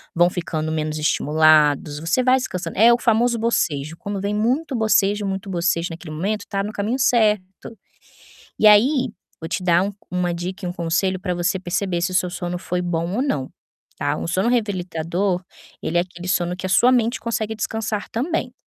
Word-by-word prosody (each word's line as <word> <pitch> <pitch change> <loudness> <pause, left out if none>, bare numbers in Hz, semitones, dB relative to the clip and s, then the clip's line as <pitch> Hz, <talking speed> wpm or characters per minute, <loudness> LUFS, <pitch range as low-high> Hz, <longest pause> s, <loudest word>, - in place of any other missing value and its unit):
vão 175 +1 +5
ficando 160 -3 -3
menos 155 -1 -2
estimulados, 150 -1 +3
você 165 +11 0
vai 255 +1 +4
descansando. 185 -8 -4
É 230 +4 +7
o - - +3
famoso 235 0 +2
bocejo. 165 -9 -1
Quando 200 -3 -5
vem 200 +1 -1
muito 255 +7 0
bocejo, 210 -2 +2
muito 195 0 -4
bocejo 175 -1 0
naquele 165 -1 -8
momento, 205 +5 -2
tá 195 -1 -1
no 210 - -4
caminho 215 +6 -2
certo. 215 -4 +1 0.8
E - - +4
aí 250 +6 +5 0.3
vou 160 - -6
te 180 - -3
dar 175 0 +4
um 200 - -3 0.2
uma 180 -1 0
dica 180 +3 -5
e - - -2
um 175 - -3
conselho 180 +2 0
pra 180 -1 -2
você 175 +2 0
perceber 180 0 -2
se 185 - 0
o - - -5
seu 180 -1 +1
sono 175 0 -4
foi 180 -1 -3
bom 170 0 -2
ou 255 - +1
não, 140 - -2 0.5
tá. - - -1
Um - - -4
sono 185 +6 +1
revigorador, 185 -4 -1 0.4
ele 175 - 0
é - - +5
aquele 180 0 -9
sono 175 -1 0
que 185 - -9
a - - -3
sua 245 +7 +5
mente 240 0 +1
consegue 220 -2 -2
descansar 215 -1 -3
também. 255 +1 -2
185 Hz, 195 wpm, -21 LUFS, 175-220 Hz, 0.8 s, É